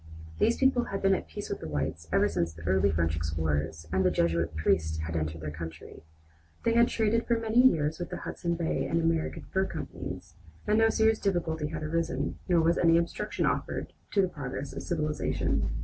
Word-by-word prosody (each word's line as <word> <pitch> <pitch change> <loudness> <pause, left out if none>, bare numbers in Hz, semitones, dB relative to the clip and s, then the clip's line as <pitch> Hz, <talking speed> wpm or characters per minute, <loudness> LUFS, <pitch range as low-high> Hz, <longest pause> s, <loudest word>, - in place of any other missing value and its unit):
These 230 - +3
people 265 -2 +3
had 195 - -4
been 195 0 +5
at 185 - -2
peace 80 - -6
with - - -3
the - - -6
whites 80 +2 -3
ever - - +4
since 85 -1 -1
the 80 0 -12
early 95 +4 +3
French 80 0 +1
explorers 80 0 -2
and 95 0 +3
the 90 - +4
Jesuit 85 -1 0
priests 80 0 +1
had 80 +1 -4
entered 80 0 -2
their 75 -1 -4
country. 80 +1 -8 0.6
They 230 - +2
had 235 0 +5
traded 225 +1 +1
for 235 - +3
many 225 +1 +3
years 160 - +3
with 175 - -4
the - - -4
Hudson 170 -1 -3
Bay 165 -1 -1
and 165 - +1
American 165 -1 0
Fur 190 0 +2
companies, - - -7 0.3
and 215 +1 +3
no 225 0 +5
serious 220 0 +3
difficulty 165 -5 -1
had 155 0 -5
arisen, 165 +2 -1
nor 175 -2 +5
was 165 +1 +2
any 165 -1 +5
obstruction 170 0 -1
offered - - -2 0.2
to 200 - +3
the - - +2
progress 140 -4 -6
of - - -5
civilization. 155 -3 -1
155 Hz, 200 wpm, -29 LUFS, -, 0.6 s, been